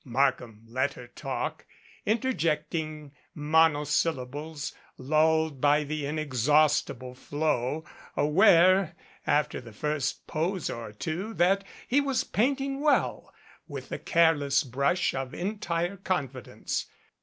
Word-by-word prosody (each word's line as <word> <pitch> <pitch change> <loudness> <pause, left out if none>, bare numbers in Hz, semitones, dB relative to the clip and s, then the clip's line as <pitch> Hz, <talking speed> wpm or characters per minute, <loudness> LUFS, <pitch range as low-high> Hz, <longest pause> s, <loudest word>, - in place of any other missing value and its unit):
Markham 125 -4 0
let 130 +4 -1
her 125 - -10
talk, 120 - -5 0.4
interjecting 160 - -1 0.2
monosyllables 150 -1 +1 0.2
lulled 155 +1 +2
by 145 +1 +4
the 150 -1 -3
inexhaustible 145 -2 +1
flow, 145 +2 -1 0.3
aware, 180 +2 +5 0.3
after 150 -3 +1
the 120 -2 -12
first 150 +5 -2
pose 170 +3 -2
or 115 -2 -6
two, 170 - -4
that 195 +3 +3 0.2
he 280 +4 +3
was 275 -2 0
painting 270 +6 0
well, 295 -1 +1 0.4
with - - -7
the - - -4
careless 155 -4 +3
brush 140 +7 0
of 130 -1 -4
entire 180 -2 -2
confidence. 140 - -3
155 Hz, 105 wpm, -28 LUFS, 140-175 Hz, 0.4 s, aware